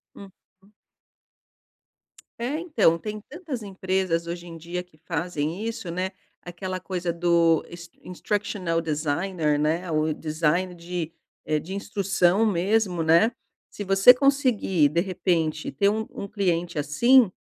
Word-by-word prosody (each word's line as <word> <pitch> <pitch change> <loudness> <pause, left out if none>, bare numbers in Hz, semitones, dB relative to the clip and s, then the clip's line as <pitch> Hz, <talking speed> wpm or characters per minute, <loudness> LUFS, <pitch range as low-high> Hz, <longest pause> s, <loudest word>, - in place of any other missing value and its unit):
Uhum. 195 0 -17 1.7
É, 255 +6 -2
então, 245 - +2
tem 210 +4 -6
tantas 300 -6 -6
empresas, 190 -3 -1
hoje 170 +1 -6
em 165 - -9
dia, 170 +2 -5
que 180 -4 -26
fazem 170 +2 -2
isso, 225 -4 -4
né? 185 +2 -2 0.3
Aquela 185 +1 -5
coisa 180 -1 -3
do 170 -1 +3
is 170 0 -10
instructional 185 -2 -2
designer, 155 +1 -1
né, 160 +5 0
o 155 0 +1
design 160 +4 -1
de 170 -1 -5 0.3
eh, 155 0 +1
de 185 +6 -7
instrução 200 -1 +1
mesmo, 195 -2 +1
né? 165 +8 +5 0.4
Se 205 - -6
você 195 +5 +8
conseguir, 250 - +2
de 165 +4 +1
repente, 170 -4 -1
ter 200 - +2
um 220 +1 -1
um - - -6
cliente 175 -5 -1
assim, 230 - +4
180 Hz, 130 wpm, -25 LUFS, 165-200 Hz, 1.7 s, você